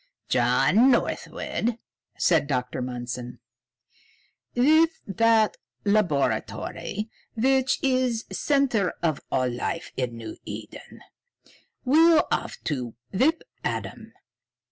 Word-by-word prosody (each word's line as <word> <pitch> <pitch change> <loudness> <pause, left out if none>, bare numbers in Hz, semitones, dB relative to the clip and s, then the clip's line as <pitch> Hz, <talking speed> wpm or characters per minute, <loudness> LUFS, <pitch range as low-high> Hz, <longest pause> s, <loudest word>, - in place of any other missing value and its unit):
"John 240 +5 +4
Northwood," 240 -2 -1 0.4
said 160 -5 +3
Dr. 125 -3 -2
Mundson, 125 0 -5 1.2
"with 315 +6 +4
that 225 +1 +3 0.3
laboratory, 170 - -1 0.2
which 265 +3 +2
is 255 -4 +1
the - - -13
center 265 -10 +1
of 155 -4 0
all 130 -1 +1
life 125 +7 -3
in 125 -3 -3
New 110 -1 -8
Eden, - - -9 0.8
we'll 320 +4 +5
have - - -1
to 125 -7 -3 0.2
whip 295 - +2 0.2
Adam. - - -4
210 Hz, 95 wpm, -25 LUFS, -, 1.2 s, we'll